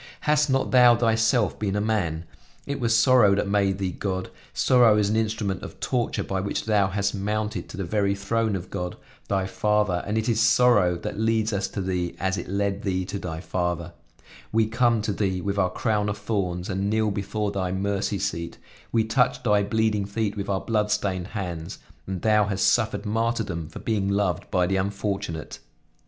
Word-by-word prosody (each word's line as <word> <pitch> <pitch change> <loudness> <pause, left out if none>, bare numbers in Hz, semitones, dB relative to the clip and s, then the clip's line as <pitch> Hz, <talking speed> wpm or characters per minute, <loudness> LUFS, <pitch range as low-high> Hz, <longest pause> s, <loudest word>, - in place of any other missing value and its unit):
Hast 150 -1 +2
not 135 0 +1
Thou 125 -2 +7
Thyself 110 -2 +2
been 100 -2 -1
a - - +1
man? 95 -7 -1 0.4
It 140 0 -3
was 115 -2 +2
sorrow 115 -4 +5
that 100 - 0
made 100 -1 +1
Thee 95 -2 -2
God; 95 0 -4 0.2
sorrow 120 -4 +4
is 105 -1 +2
an - - +1
instrument 110 -4 -1
of - - -9
torture 120 -3 -1
by 95 -1 -2
which 100 - -3
Thou 105 -3 +3
hast 100 +1 -1
mounted 105 +2 -2
to - - -9
the 100 - -2
very 100 +2 0
throne 110 +2 0
of 90 -1 -6
God, 90 -2 -4 0.3
Thy 95 -1 0
Father, 105 -3 0
and 105 +2 -1
it 110 +1 -1
is 115 -2 +1
sorrow 115 -6 +4
that 100 - -5
leads 110 0 +1
us 100 0 0
to 100 - -5
Thee 90 -2 -2
as 95 0 0
it 90 - -5
led 100 +1 -1
Thee 95 -2 -1
to 100 - -5
Thy 80 -3 -5
Father; 85 -2 -2 0.6
we 110 0 +3
come 115 0 +2
to 105 -1 -1
Thee 95 -2 -1
with 100 +2 -2
our 95 -1 +3
crown 105 +1 0
of 105 - -3
thorns 95 -4 -2
and 100 0 -1
kneel 110 0 +1
before 100 +1 -2
Thy 95 -2 -2
mercy 100 +2 -1
seat; 90 -4 -3 0.3
we 115 -1 +3
touch 125 +2 +1
Thy 105 -3 +3
bleeding 105 0 0
feet 105 0 -2
with 100 -1 -4
our 95 -1 0
bloodstained 105 -4 0
hands, 90 -6 -5 0.3
and 95 -2 -4
Thou 105 -1 +4
hast 100 -2 +1
suffered 110 0 +1
martyrdom 110 -7 -1
for - - -10
being 105 -3 -1
loved 100 -2 0
by 90 -2 +2
the 95 +2 0
unfortunate." 95 -4 -3
100 Hz, 195 wpm, -25 LUFS, 95-110 Hz, 0.6 s, Thou